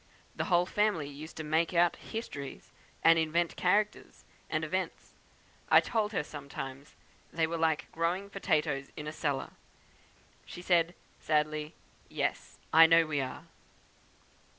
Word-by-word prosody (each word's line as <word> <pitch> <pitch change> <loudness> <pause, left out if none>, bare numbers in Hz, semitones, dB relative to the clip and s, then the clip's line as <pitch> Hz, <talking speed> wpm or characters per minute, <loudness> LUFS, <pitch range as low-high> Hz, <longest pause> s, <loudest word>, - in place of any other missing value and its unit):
The - - -2
whole 175 -3 +3
family 195 -6 0
used 145 +3 -10
to 160 - -4
'make 160 +3 +1
out' 175 0 +4
histories, 145 - -7 0.3
and 165 0 +7
invent 165 +2 0
characters 205 +3 0 0.2
and - - -1
events. - - -3 0.6
I - - +8
told 215 -3 -1
her 190 - -1
sometimes 140 -2 -8 0.4
they 165 -1 +1
were 165 +1 -3
like 160 -2 +1
growing 175 +5 -1
potatoes 150 -7 0
in 150 - -5
a 150 - -4
cellar. 145 -4 -2 0.9
She 175 - -10
said, 175 -1 +2 0.2
sadly, 150 0 0 0.3
'Yes! - - -3 0.2
I 165 +1 +9
know 165 0 +6
we 150 -2 -1
are!' 135 +4 -6
160 Hz, 135 wpm, -31 LUFS, 150-175 Hz, 0.9 s, I